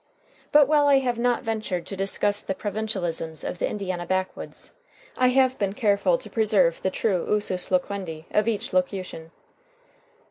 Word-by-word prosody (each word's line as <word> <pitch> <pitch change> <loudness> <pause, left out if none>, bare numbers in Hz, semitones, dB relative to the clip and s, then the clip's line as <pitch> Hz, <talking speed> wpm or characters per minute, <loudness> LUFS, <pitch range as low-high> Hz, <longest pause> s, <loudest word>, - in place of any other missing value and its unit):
But 295 -2 +6
while 295 -1 +4
I 280 -1 +6
have 245 -3 0
not 245 +1 +1
ventured 215 -6 -3
to 195 - -6
discuss 200 +1 +2
the 190 - -3
provincialisms 190 -7 -2
of 175 - -5
the - - 0
Indiana 185 -4 -4
backwoods, 185 0 -3 0.4
I 255 - +3
have 260 0 +3
been 195 -1 0
careful 200 -6 +2
to - - -11
preserve 205 -7 +2
the 190 - +1
true 185 -1 -1
usus 205 -4 0
loquendi 180 -4 -2
of 210 +1 +2
each 220 -5 -2
locution. 185 -3 -2
200 Hz, 155 wpm, -25 LUFS, 185-225 Hz, 0.4 s, But